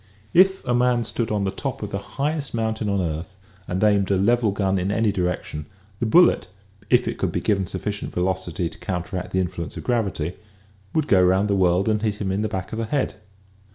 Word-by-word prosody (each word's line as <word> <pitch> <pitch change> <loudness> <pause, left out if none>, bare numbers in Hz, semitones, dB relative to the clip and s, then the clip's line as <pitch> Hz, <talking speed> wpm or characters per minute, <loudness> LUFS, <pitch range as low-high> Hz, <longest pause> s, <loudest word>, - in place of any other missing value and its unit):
If 190 +2 +5
a 120 - +1
man 120 -1 +3
stood 115 0 -2
on 105 -2 0
the 95 - 0
top - - -4
of - - -5
the - - -2 0.2
highest 145 -1 -1
mountain 110 -1 -1
on 100 -1 +1
earth 85 +3 -4 0.3
and 95 +3 -1
aimed 100 -2 +3
a 100 - +3
level 115 +2 +3
gun 95 -1 0
in 90 +2 -1
any 110 +1 +2
direction, 90 -5 -3 0.3
the 115 - 0
bullet, 175 +9 +5 0.4
if - - +4
it - - -3
could - - 0
be - - -1
given 100 -3 0
sufficient 100 +2 -4
velocity 90 -1 -1
to - - -11
counteract 90 0 -4
the 95 - 0
influence 85 -3 -3
of - - -6
gravity, 100 -9 -1 0.6
would 155 -2 +2
go 95 -2 +5
around 95 +3 +3
the - - +3
world 90 +1 +3
and 105 -1 +2
hit 105 -2 0
him 100 -2 -2
in 100 +2 0
the 110 - -1
back 95 +1 -4
of 110 - -3
the 115 - -1
head. 135 +4 0
100 Hz, 220 wpm, -23 LUFS, 95-115 Hz, 0.6 s, If